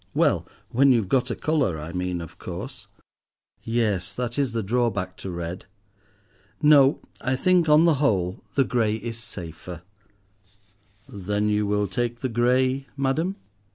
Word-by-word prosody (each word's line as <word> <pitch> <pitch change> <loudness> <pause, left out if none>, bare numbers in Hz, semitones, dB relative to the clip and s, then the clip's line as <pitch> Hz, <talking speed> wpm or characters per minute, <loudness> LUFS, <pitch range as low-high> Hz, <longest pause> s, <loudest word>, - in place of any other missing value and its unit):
"Well, - - +2 0.2
when 135 +3 +5
you've 115 -7 +2
got 130 +2 +2
a 120 - -2
colour, 140 - 0
I 80 +3 -7
mean, 90 -1 -2
of 85 0 -10
course!" 105 +5 -7 0.7
"Yes, 105 -6 0
that 120 +3 -3
is 135 -4 +1
the 115 -1 -2
drawback 100 -4 0
to 95 - -7
red. 85 +1 -5 0.9
No, 145 -2 +5 0.2
I 130 0 0
think, 175 +3 +3
on 150 +2 +6
the 170 - +5
whole, 95 -9 +1
the 140 - +4
grey 115 -4 +1
is 115 +1 -6
safer." 90 -4 -8 1.2
"Then 105 +1 -2
you 105 0 +1
will 105 0 +1
take 120 +5 -2
the 130 - -1
grey, 130 +3 +1
madam?" 155 +8 0
115 Hz, 150 wpm, -25 LUFS, 95-130 Hz, 1.2 s, on